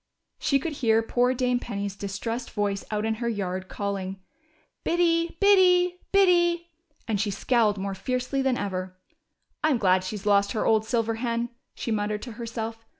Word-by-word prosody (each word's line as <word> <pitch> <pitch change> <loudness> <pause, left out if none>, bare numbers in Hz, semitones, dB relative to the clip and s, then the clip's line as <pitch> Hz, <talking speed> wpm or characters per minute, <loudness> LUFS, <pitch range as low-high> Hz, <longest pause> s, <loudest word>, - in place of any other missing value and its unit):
She 275 - +2
could 310 +3 -3
hear 225 -2 +4
poor 245 +2 +1
Dame 250 -1 +1
Penny's 200 -4 -4
distressed 225 +5 -4
voice 205 -2 -1
out 210 0 -1
in 220 - +1
her 235 - 0
yard, 185 -3 -3
calling 195 -1 -3 0.6
Biddy, 335 -1 +1
Biddy, 360 -3 +5
Biddy;" 345 -3 +3 0.4
and 210 -3 0
she 210 - 0
scowled 210 +1 +2
more 195 0 -3
fiercely 255 +6 -2
than 265 -2 +1
ever. 185 -2 -4 0.7
I'm 305 -4 +3
glad 185 -3 +3
she's 195 +2 -5
lost 200 +1 +3
her 220 - -1
old 220 -1 +3
silver 230 -1 0
hen," 235 0 -1 0.3
she 230 - -4
muttered 210 0 -1
to 245 - -7
herself. 225 0 -5
225 Hz, 160 wpm, -26 LUFS, 200-260 Hz, 0.7 s, Biddy